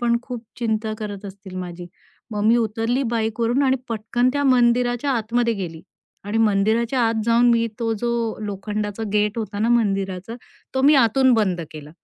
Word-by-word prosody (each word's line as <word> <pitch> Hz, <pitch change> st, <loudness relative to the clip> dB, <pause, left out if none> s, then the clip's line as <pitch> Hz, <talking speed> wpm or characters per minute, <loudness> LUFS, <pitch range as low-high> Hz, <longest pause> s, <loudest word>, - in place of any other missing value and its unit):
पण 235 Hz, -1 st, +2 dB
खूप 245 Hz, -3 st, -7 dB
चिंता 220 Hz, -2 st, -1 dB
करत 205 Hz, -1 st, -6 dB
असतील 190 Hz, -1 st, -10 dB
माझी.मग 180 Hz, +4 st, -8 dB
मी 230 Hz, +2 st, +5 dB
उतरली 225 Hz, +3 st, 0 dB
बाईकवरून 230 Hz, +3 st, 0 dB
आणि 265 Hz, -1 st, +3 dB
पटकन 230 Hz, +2 st, 0 dB
त्या 285 Hz, +1 st, 0 dB
मंदिराच्या 245 Hz, +1 st, +3 dB
आतमध्ये 235 Hz, 0 st, +1 dB
गेली 170 Hz, -5 st, -6 dB, 0.4 s
आणि 210 Hz, +2 st, -1 dB
मंदिराच्या 225 Hz, +4 st, +2 dB
आत 225 Hz, -, -1 dB
जाऊन 235 Hz, +1 st, +4 dB
मी 230 Hz, 0 st, +3 dB
तो 225 Hz, -1 st, 0 dB
जो 240 Hz, 0 st, 0 dB, 0.4 s
लोखंडाचा 205 Hz, +1 st, -4 dB
गेट 210 Hz, +2 st, +1 dB
होता 210 Hz, -2 st, -4 dB
ना 220 Hz, +3 st, +1 dB
मंदिराचा 195 Hz, -3 st, 0 dB, 0.4 s
तो 265 Hz, -, +1 dB
मी 290 Hz, +3 st, +6 dB
आतून 260 Hz, +3 st, +3 dB
बंद 190 Hz, -6 st, +1 dB
केला. 150 Hz, -1 st, -10 dB
225 Hz, 160 wpm, -22 LUFS, 205-240 Hz, 0.4 s, मी